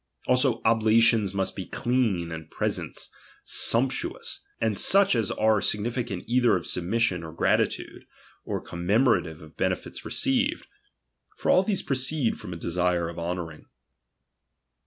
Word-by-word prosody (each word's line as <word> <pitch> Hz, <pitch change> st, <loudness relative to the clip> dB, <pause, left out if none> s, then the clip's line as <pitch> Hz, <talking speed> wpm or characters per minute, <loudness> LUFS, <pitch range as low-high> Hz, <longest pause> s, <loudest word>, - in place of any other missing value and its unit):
Also 125 Hz, 0 st, +2 dB
oblations 110 Hz, -2 st, +3 dB
viust 95 Hz, -1 st, -2 dB
he -, -, -5 dB
clean, 110 Hz, -9 st, 0 dB
and 80 Hz, -1 st, -7 dB
presents -, -, -3 dB, 0.3 s
sumptuous; 125 Hz, +3 st, 0 dB, 0.2 s
and 110 Hz, -2 st, 0 dB
such 195 Hz, -, +5 dB
as 115 Hz, -4 st, 0 dB
are 110 Hz, -1 st, +2 dB
significative 115 Hz, -2 st, -2 dB
either 120 Hz, -1 st, +3 dB
of 90 Hz, -, -3 dB
submission 90 Hz, 0 st, 0 dB
or 80 Hz, -, -7 dB
gratitude, 80 Hz, -, -1 dB, 0.4 s
or -, -, -3 dB
commemorative 90 Hz, -, 0 dB
of 75 Hz, -, -15 dB
benefits -, -, -2 dB
received. 270 Hz, +3 st, 0 dB, 0.7 s
For -, -, +1 dB
all 185 Hz, -, +6 dB
these 195 Hz, 0 st, -1 dB
proceed 130 Hz, -1 st, -1 dB
from -, -, -8 dB
a 85 Hz, -, -5 dB
desire 85 Hz, 0 st, 0 dB
of 85 Hz, -, -8 dB
honouring. 85 Hz, -2 st, -5 dB
110 Hz, 130 wpm, -26 LUFS, 85-125 Hz, 0.7 s, all